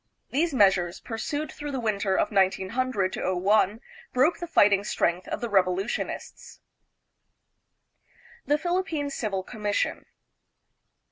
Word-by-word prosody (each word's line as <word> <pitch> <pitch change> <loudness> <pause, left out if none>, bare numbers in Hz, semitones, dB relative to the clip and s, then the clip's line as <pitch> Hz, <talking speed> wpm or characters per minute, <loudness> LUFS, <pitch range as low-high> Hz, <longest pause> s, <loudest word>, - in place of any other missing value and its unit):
These 325 +5 +1
measures, 190 -8 +3
pursued 290 +7 -4
through 290 0 -6
the 265 - -2
winter 205 -4 0
of 205 - +1
1900 195 +2 +1
01, 195 +4 +2 0.3
broke 265 +7 +2
the 345 - -5
fighting 205 -10 +4
strength 175 -3 0
of - - -4
the 240 - -1
revolutionists. 190 +1 -1 1.9
The 295 - +3
Philippine 330 -4 -1
Civil 205 -7 -2
Commission. 210 -1 -2
210 Hz, 110 wpm, -26 LUFS, 190-280 Hz, 1.9 s, fighting